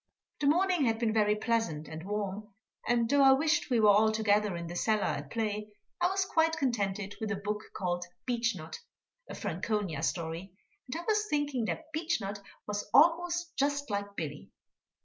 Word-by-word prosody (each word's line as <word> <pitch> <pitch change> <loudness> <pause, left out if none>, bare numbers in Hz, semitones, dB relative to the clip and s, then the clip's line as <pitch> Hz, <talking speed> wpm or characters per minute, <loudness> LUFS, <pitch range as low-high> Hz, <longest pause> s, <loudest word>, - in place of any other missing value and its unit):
The 285 - +1
morning 355 0 +3
had 225 -1 +2
been 225 -2 0
very 210 -1 +3
pleasant 210 -9 -1
and 160 0 -7
warm, 205 +1 -4 0.3
and 235 -1 +2
though 285 +3 +4
I 270 -1 +8
wished 315 +4 +1
we 245 -3 +3
were 210 -1 +7
all 215 +2 +5
together 210 -3 +2
in 170 - -5
the 170 +1 -6
cellar 215 +3 +1
at - - -2
play, 215 -2 -2 0.3
I 350 - +5
was 385 +1 0
quite 320 -3 +2
contented 205 -7 -1
with 220 - -2
a 210 - 0
book 210 +2 -3
called 175 -2 -2 0.2
Beechnut, 230 -10 -2 0.5
a - - -6
Franconia 195 -3 -2
story, 170 +2 -3 0.3
and 305 +6 -4
I 345 - -8
was 425 -1 +2
thinking 290 -5 0
that 315 +8 -5
Beechnut 300 - -2 0.3
was 205 0 -4
almost 340 +4 +3
just 285 -2 0
like 200 0 -3
Billy. 145 -4 -5
220 Hz, 175 wpm, -30 LUFS, 200-285 Hz, 0.5 s, I